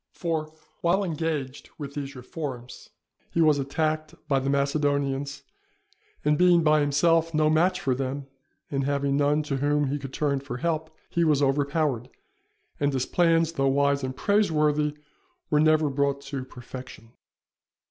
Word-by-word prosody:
For 160 -3 -2 0.3
while 180 +4 +2
engaged 155 -6 -3
with 140 -2 -7
these 140 -1 -5
reforms, 125 -1 -7 0.4
he - - -2
was 155 -3 +4
attacked 155 +3 -1
by 135 -2 +2
the 135 +1 -2
Macedonians, 140 -1 0 0.8
and 150 0 +3
being 175 -2 +5
by 155 0 +4
himself 165 +3 +2
no 155 0 +3
match 180 +4 +3
for 130 - 0
them, 135 +2 -3 0.5
and 135 -1 0
having 140 0 0
none 145 +1 +2
to 140 -2 -2
whom 145 0 +1
he 145 - -1
could 135 -1 -7
turn 140 -1 0
for 135 -2 -6
help, 160 +1 -1 0.2
he 170 - +2
was 150 -3 +3
overpowered; 140 -2 0 0.7
and 145 0 +1
his 130 -2 -1
plans, 165 -2 +2
though 135 -4 0
wise 140 +1 +2
and 130 0 -4
praiseworthy, 150 -7 +2 0.5
were 150 - +4
never 155 0 +4
brought 140 0 0
to 140 -2 -5
perfection. 125 -2 -10
145 Hz, 150 wpm, -26 LUFS, 140-155 Hz, 0.8 s, being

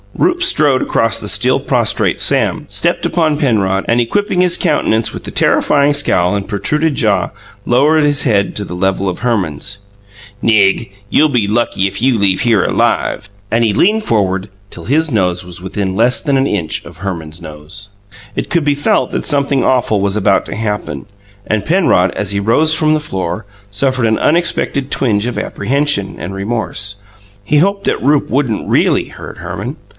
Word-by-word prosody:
Rupe 360 0 +1
strode 385 - +3
across - - +1
the - - -6
still - - +3
prostrate - - 0
Sam, - - +2
stepped - - 0
upon 160 -4 +1
Penrod, 100 -9 0
and, 115 +1 +2
equipping 180 - 0
his 180 -1 +3
countenance 115 -9 +1
with - - -8
the - - -7
terrifying 145 0 +2
scowl 95 -10 +2
and 100 -1 -3
protruded 150 +9 -1
jaw, 100 -7 +1 0.4
lowered 150 +6 +3
his 145 -1 +2
head 100 -6 +1
to 105 - -2
the 90 - -7
level 95 +1 -1
of 90 - -5
Herman's. 100 -6 -2 0.6
"Nig, 105 -1 +2 0.2
you'll 155 - +3
be 120 -7 0
lucky 105 -3 0
if 95 - -5
you 130 -1 +2
leave 95 -2 +2
here 115 -5 +2
alive!" - - 0 0.2
And 115 +1 +1
he 110 -3 +1
leaned 210 - +2
forward 95 - 0 0.2
till - - -11
his 155 +5 +1
nose 90 -5 0
was 90 0 -8
within 95 0 -3
less 120 +4 +2
than 140 -3 +1
an 135 +1 +1
inch 85 -7 -2
of 85 -1 -12
Herman's 85 -3 -6
nose. 80 +6 -10 0.5
It - - -3
could 170 -3 +1
be 145 0 +1
felt 145 - 0
that - - -3
something 140 -2 +1
awful 120 -5 +1
was 100 0 0
about 100 -2 +2
to - - -6
happen, 105 -10 -4 0.4
and 110 -2 -1
Penrod, 155 - +2
as 100 -2 -2
he 100 - -1
rose 135 +10 +2
from 155 -1 +2
the 155 - +1
floor, 95 - -4 0.3
suffered 130 +3 0
an 110 0 +1
unexpected 150 -4 0
twinge 110 -5 0
of 125 - -3
apprehension 140 -7 -1
and 85 +5 -6
remorse: 100 -1 -3 0.5
he 150 +9 +1
hoped 200 +5 +1
that - - 0
Rupe 145 +2 +2
wouldn't 125 -5 -1
REALLY - - +2
hurt - - -11
Herman. 95 - -6
110 Hz, 180 wpm, -14 LUFS, 95-145 Hz, 0.6 s, strode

